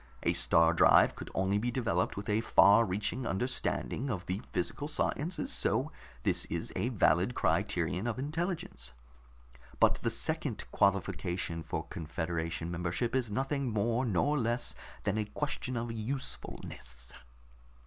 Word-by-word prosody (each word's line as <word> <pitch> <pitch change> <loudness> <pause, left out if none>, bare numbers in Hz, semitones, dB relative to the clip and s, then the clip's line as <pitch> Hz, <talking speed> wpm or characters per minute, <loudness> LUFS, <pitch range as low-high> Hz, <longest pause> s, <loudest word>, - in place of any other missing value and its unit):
A - - +2
star 80 0 +4
drive 85 - +6
could - - -8
only 95 +2 +1
be 120 +3 -1
developed 120 -4 0
with 100 - -5
a 105 +1 +2
far 115 0 +6
reaching 105 +5 -2
understanding 125 +4 -1
of 95 -7 -3
the 95 +3 -2
physical 145 +11 -2
sciences, 155 +2 -1
so - - +2 0.3
this - - +1
is - - -4
a - - 0
valid 90 +10 +2
criterion 90 +2 0
of 120 - -2
intelligence. 150 - -3 0.9
But - - +4
the - - +1
second - - -2
qualification 90 -3 0
for 80 - -4
confederation 80 +1 -3
membership 90 +8 -1
is 125 -4 +1
nothing 135 +4 -1
more 115 +3 +1
nor 135 +7 +1
less 120 +1 -1 0.3
than 105 +2 0
a 105 - 0
question 130 +1 -3
of 115 0 -3
usefulness." 110 - -5
105 Hz, 140 wpm, -31 LUFS, 85-125 Hz, 0.9 s, drive